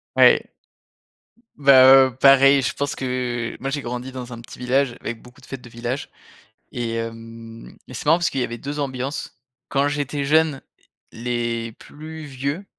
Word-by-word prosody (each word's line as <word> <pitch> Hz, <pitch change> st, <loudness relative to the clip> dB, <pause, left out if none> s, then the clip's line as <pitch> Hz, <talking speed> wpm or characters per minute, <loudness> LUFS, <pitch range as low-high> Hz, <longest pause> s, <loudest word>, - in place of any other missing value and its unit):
Ouais. -, -, +5 dB, 1.1 s
Bah, 135 Hz, -2 st, +7 dB, 0.2 s
heu, 130 Hz, -, -10 dB
pareil, 135 Hz, 0 st, +6 dB
je -, -, -1 dB
pense 145 Hz, 0 st, -3 dB
que 125 Hz, -2 st, -3 dB
moi, 135 Hz, -, -2 dB
j'ai 140 Hz, 0 st, -3 dB
grandi 125 Hz, +2 st, -5 dB
dans 125 Hz, -1 st, -7 dB
un 115 Hz, -, -9 dB
petit 120 Hz, -, -13 dB
village 125 Hz, 0 st, 0 dB
avec 115 Hz, -1 st, -6 dB
beaucoup 125 Hz, +3 st, -17 dB
de 130 Hz, -, -17 dB
fêtes 135 Hz, -2 st, -8 dB
de 120 Hz, -, -13 dB
village 120 Hz, +4 st, -5 dB, 0.6 s
et 120 Hz, -2 st, -3 dB
hem, 115 Hz, 0 st, -8 dB
mais 125 Hz, -, -11 dB
c'est 125 Hz, -, -7 dB
marrant 165 Hz, +3 st, +6 dB
parce 170 Hz, -1 st, 0 dB
qu'il 135 Hz, -, -2 dB
y -, -, +2 dB
avait 120 Hz, 0 st, -5 dB
2 145 Hz, +5 st, -6 dB
ambiances. 135 Hz, -1 st, -4 dB, 0.3 s
Quand 140 Hz, +1 st, +1 dB
j'étais 145 Hz, -1 st, -2 dB
jeune, 155 Hz, -1 st, +2 dB, 0.5 s
les 115 Hz, -1 st, -3 dB
plus 155 Hz, +5 st, -11 dB
vieux, 140 Hz, +6 st, -4 dB
130 Hz, 175 wpm, -22 LUFS, 120-140 Hz, 1.1 s, Bah